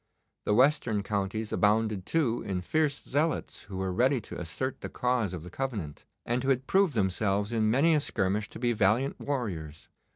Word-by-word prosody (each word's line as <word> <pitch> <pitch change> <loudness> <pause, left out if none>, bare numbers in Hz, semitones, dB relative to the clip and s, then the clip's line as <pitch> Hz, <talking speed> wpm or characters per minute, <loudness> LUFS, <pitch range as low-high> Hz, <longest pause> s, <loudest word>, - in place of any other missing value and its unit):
The 105 - +2
western 125 -5 +3
counties 105 +2 -2
abounded, 105 -2 +2
too, 135 -8 +1
in 95 -2 -3
fierce 145 - 0
zealots 150 +4 -1
who 95 - -7
were 95 -1 -2
ready 130 +7 +3
to - - -8
assert 90 - -3
the - - -5
cause 125 -6 0
of 90 -4 -6
the 90 - -10
Covenant, 105 - -4 0.2
and 120 +2 0
who 135 - -1
had 130 -1 +2
proved 190 -4 +3
themselves 100 +1 0
in 110 -2 +2
many 140 +8 +4
a 150 - +4
skirmish 105 -6 -1
to - - -10
be 120 0 +1
valiant 110 +6 +1
warriors. 90 - -4
110 Hz, 185 wpm, -29 LUFS, 95-135 Hz, 0.2 s, many